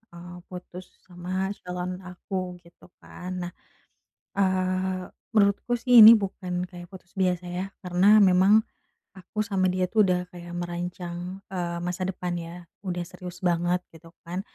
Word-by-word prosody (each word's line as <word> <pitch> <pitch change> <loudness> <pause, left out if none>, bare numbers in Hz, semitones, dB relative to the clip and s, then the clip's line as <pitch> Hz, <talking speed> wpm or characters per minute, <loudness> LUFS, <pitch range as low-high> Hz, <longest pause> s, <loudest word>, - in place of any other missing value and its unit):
eee, 175 +1 -10
putus 180 0 -9 0.2
sama 185 +2 -3
calon 180 0 -4
aku 180 0 -5
gitu 170 +1 -19 0.2
kan. 180 +1 -8
Nah, 175 - -5 0.9
eee, 185 -1 +1 0.3
menurutku 200 +3 +3
sih 245 -1 +6
ini 220 +1 +12
bukan 190 -4 -2
kayak 175 -1 -10
putus 185 -1 -14
biasa 180 -1 +1
ya, 180 +1 -2 0.2
karena 180 +1 +1 0.2
memang 195 +3 +6 0.6
aku 190 +3 -4
sama 195 -3 0
dia 185 0 +1
tuh 215 0 +4
udah 180 -1 +2
kayak 175 0 -9
merancang, 175 0 -4 0.4
eee, 175 -2 -2
masa 180 +1 -3
depan 180 -1 -3
ya, 170 +1 -9 0.2
udah 180 -3 -3
serius 180 0 -9
banget 175 +1 +1
gitu 165 +1 -15 0.2
kan. 180 +3 -3
180 Hz, 145 wpm, -26 LUFS, 175-190 Hz, 0.9 s, ini